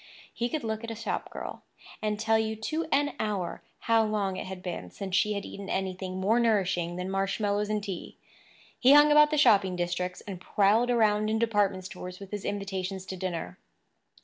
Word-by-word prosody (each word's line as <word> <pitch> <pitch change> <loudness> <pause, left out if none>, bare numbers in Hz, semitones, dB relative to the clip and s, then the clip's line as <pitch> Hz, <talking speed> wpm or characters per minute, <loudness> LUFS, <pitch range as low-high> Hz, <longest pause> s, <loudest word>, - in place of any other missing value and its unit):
He 240 +1 -1
could 310 -2 -3
look 220 0 -3
at 230 - -5
a 225 - -4
shop 225 +2 -3
girl - - -7 0.4
and 210 -1 -1
tell 220 0 +3
you 220 0 -1
to 310 +10 -3
an 290 0 +2
hour 200 -5 -2 0.2
how 225 -1 +3
long 210 -3 -1
it - - -5
had 185 -1 -7
been 170 - -5
since 190 - -4
she 210 +2 +3
had 200 -1 -4
eaten 200 0 -8
anything 185 -1 -3
more 215 +5 +3
nourishing 190 -7 +1
than 180 +1 -4
marshmallows 200 +2 0
and 210 -1 -1
tea. 195 -4 -6 0.6
He 260 +2 +7
hung 295 +1 +7
about 300 0 +7
the 305 - 0
shopping 205 -9 +5
districts, 180 +1 -2
and 190 -3 -8
prowled 210 +6 +3
around 215 -3 +3
in 220 - +1
department 205 -5 +1
stores 180 0 -8
with 195 -1 -10
his 205 -1 -5
invitations 195 -1 -3
to 190 - -6
dinner. 170 - -4
205 Hz, 195 wpm, -28 LUFS, 185-220 Hz, 0.6 s, He